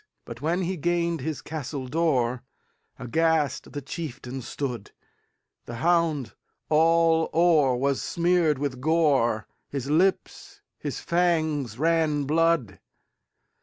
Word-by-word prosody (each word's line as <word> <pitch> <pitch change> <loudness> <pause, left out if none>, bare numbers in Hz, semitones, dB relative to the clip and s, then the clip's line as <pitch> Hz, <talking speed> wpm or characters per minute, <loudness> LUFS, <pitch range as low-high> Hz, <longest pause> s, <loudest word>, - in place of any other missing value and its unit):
But, 115 0 -9
when 170 +5 0
he 185 +1 -2
gained 170 0 0
his 155 +1 -4
castle 145 -3 -5
door, 130 -5 0 0.6
Aghast 155 +2 0
the 145 -1 -6
chieftain 135 -3 -6
stood; 120 -4 -5 0.8
The 120 - -7
hound 160 -4 +1 0.4
all 165 +1 +3
o'er 160 -6 +4
was 135 +2 0
smeared 170 -3 +1
with 135 -2 -3
gore, 135 - +2 0.2
His 140 0 -4
lips, 185 +5 0 0.2
his - - -4
fangs, 155 -8 0
ran 155 -1 +1
blood. 155 - +1
155 Hz, 110 wpm, -25 LUFS, 130-165 Hz, 0.8 s, o'er